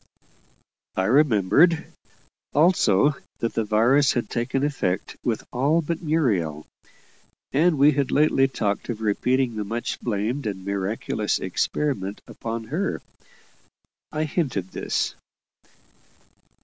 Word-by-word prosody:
I 95 - +1
remembered. 135 - +3 0.6
Also 150 - +4 0.2
that 115 - -2
the 115 - 0
virus 120 +7 +3
had 120 -3 -2
taken 130 +3 -1
effect 135 -11 -1
with 115 -3 -1
all 145 +7 +2
but 165 +2 -3
Muriel; 105 - 0 0.9
and 160 +3 +3
we 145 +2 +6
had 140 -2 0
lately 140 -2 +3
talked 110 -6 -2
of 110 -2 -4
repeating 120 +3 +1
the 105 - -1
much 115 +4 -4
blamed 115 +4 -2
and 95 -2 -5
miraculous 100 +2 -1
experiment 100 +2 -2
upon 115 0 -5
her. 190 +5 -1 1.1
I 155 0 -1
hinted 135 - -2
this. - - -1
120 Hz, 110 wpm, -24 LUFS, 105-145 Hz, 1.1 s, we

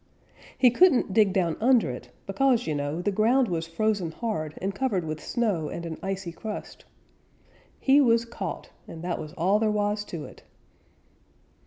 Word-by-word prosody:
He 250 -2 +5
couldn't 260 - +4
dig 210 -2 +4
down 175 -4 0
under 240 - +4
it, 125 - -9 0.2
because, 245 +4 +2
you 155 - -1
know, 145 +4 -3
the 205 - +1
ground 235 +6 +3
was 165 -3 -2
frozen 195 +1 0
hard 160 -7 -4
and 195 +2 -2
covered 205 -6 -1
with 155 -1 -5
snow 205 -10 -1
and 170 - -6
an 160 -1 -6
icy 195 -2 -4
crust. 210 +5 -7 0.9
He 280 +2 +5
was 230 -3 +3
caught, 235 - -6 0.2
and 165 0 -9
that 175 -1 -2
was 155 -1 -7
all 190 +5 +2
there 220 -1 +2
was 210 0 0
to 165 -6 -6
it. - - -13
200 Hz, 170 wpm, -26 LUFS, 165-230 Hz, 0.9 s, He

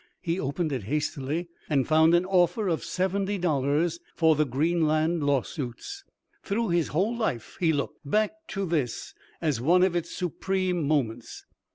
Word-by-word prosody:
He 170 +2 -1
opened 150 +2 -1
it 125 -8 -3
hastily, 150 - -2 0.2
and 140 -4 +2
found 160 +2 +5
an 175 +1 +3
offer 185 +2 +2
of 165 -3 0
seventy 195 +2 -1
dollars 160 0 +1 0.2
for 160 -1 +4
the 150 0 +1
"Greenland 160 +3 +1
Lawsuits." 145 - -2 0.4
Through 220 +1 -1
his 170 -2 +2
whole 195 +10 0
life 175 - -2
he 165 -3 +3
looked 145 -2 -2
back 210 +9 +1 0.2
to 195 -2 -3
this 150 -9 -2 0.3
as 145 -7 0
one 175 +7 +4
of 185 -2 +2
its 170 -1 -1
supreme 180 -2 -1
moments. 120 -6 -2
165 Hz, 155 wpm, -27 LUFS, 145-185 Hz, 0.4 s, found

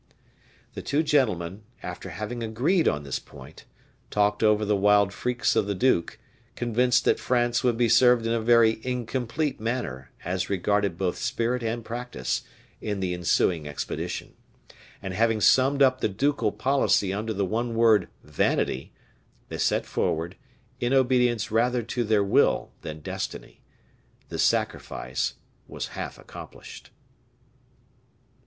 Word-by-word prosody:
The - - -6
two 150 +3 0
gentlemen, 105 - +1 0.2
after - - -6
having 110 +3 -5
agreed 130 - +1
on 75 0 0
this 70 -2 -3
point, - - -14 0.4
talked 105 0 +1
over 105 -1 +3
the 105 0 +2
wild 100 0 +4
freaks 125 +3 0
of 100 - +2
the 100 - -1
duke, 95 -4 +1 0.4
convinced 125 +2 +2
that - - +3
France 120 -1 +1
would 120 -2 +2
be 120 0 +3
served 115 +1 +5
in 115 - +1
a 115 - 0
very 115 -1 +4
incomplete 125 +3 -2
manner, 110 - -3 0.2
as 90 +2 -2
regarded 100 -1 0
both 90 -1 -1
spirit 120 +2 -1
and 115 0 -3
practice, 120 - -3 0.4
in 105 -2 -3
the 90 -2 -1
ensuing 85 -2 +1
expedition; 75 - -5 0.7
and 95 - -4
having 110 +2 +2
summed 135 +7 +4
up 130 -1 +3
the - - +1
ducal 120 +1 0
policy 105 -4 +1
under 110 +3 -3
the 100 -2 -1
one 115 +4 -2
word 110 -5 +4 0.2
vanity, 75 -3 -1 0.6
they - - -6
set - - +1
forward, 85 +3 -2 0.4
in 120 +2 0
obedience 125 -5 +2
rather 120 +2 +2
to 120 +2 -2
their 105 -2 +2
will 100 - +2
than 75 0 -7
destiny. - - -6 0.7
The - - -5
sacrifice 65 +1 -1 0.3
was - - -5
half - - -6
accomplished. - - -11
110 Hz, 140 wpm, -26 LUFS, 100-125 Hz, 0.7 s, served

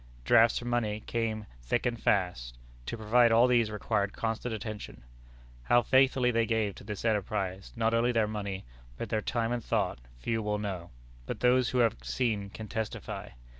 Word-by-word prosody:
Drafts 115 - +5
for 120 - -4
money 110 -3 -1
came 110 -2 -2 0.2
thick 90 - -1
and 120 -2 -1
fast. 60 -12 0 0.3
To - - -3
provide 115 +2 +4
for 115 - +4
all 115 +2 +7
these 120 -3 +3
required 100 -1 -1
constant 115 +1 -2
attention. 110 - -6 0.6
How 120 - +3
faithfully 130 -1 +4
they 115 -1 +1
gave 110 -3 0
to - - -13
this 105 +1 -6
enterprise, 100 -3 -1
not 115 -1 +1
only 115 +2 +3
their 115 -2 +2
money, 100 -2 -4 0.3
but - - -5
their 110 - 0
time 115 +1 -1
and 120 -2 -2
thought, - - 0 0.2
few 115 - -1
will 105 0 -1
know; 95 -5 -4 0.4
but - - -5
those 125 0 +4
who 130 - -1
have 115 -3 +3
seen 100 - -1
can 110 +2 -8
testify. 110 0 -4
110 Hz, 180 wpm, -30 LUFS, 105-120 Hz, 0.6 s, all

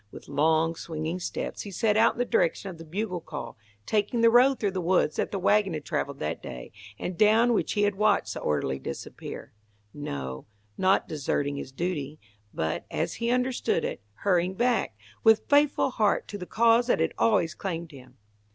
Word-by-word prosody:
With - - -12
long, 160 +3 +2
swinging 160 +1 -4
steps - - -4
he 205 - -7
set 210 +2 +1
out 225 +2 +4
in - - -16
the 245 - +1
direction 185 -1 0
of 170 - -12
the - - -8
bugle 180 +2 -3
call, - - -7 0.3
taking 215 +2 0
the 230 0 +6
road 255 +2 +5
through 205 -3 0
the 185 -1 -3
woods 170 -3 +2
that - - 0
the 200 - -3
wagon 195 -1 +2
had 150 - -6
travelled 140 0 -2
that 75 - -3
day, 60 -1 -8 0.3
and 180 - -4
down 220 +5 +4
which - - 0
he 205 - +1
had 205 0 +2
watched 210 +1 +1
the - - -5
orderly 70 -3 -1
disappear. - - -7 0.4
No, 65 - -6 0.3
not 190 +1 +2
deserting 145 -1 -2
his 135 - -6
duty, 155 -2 -3 0.3
but, 80 0 -3
as - - -2
he 235 - +1
understood 250 +1 0
it, - - -4 0.2
hurrying 185 -1 +2
back, 240 - 0 0.3
with 220 -1 +5
faithful 285 -2 +3
heart 210 -4 +1
to 205 - -6
the 180 - -7
cause 235 +1 +4
that - - +2
had - - +1
always 200 -7 +3
claimed 170 -3 -5
him. 130 -2 -14
185 Hz, 190 wpm, -27 LUFS, 155-220 Hz, 0.4 s, the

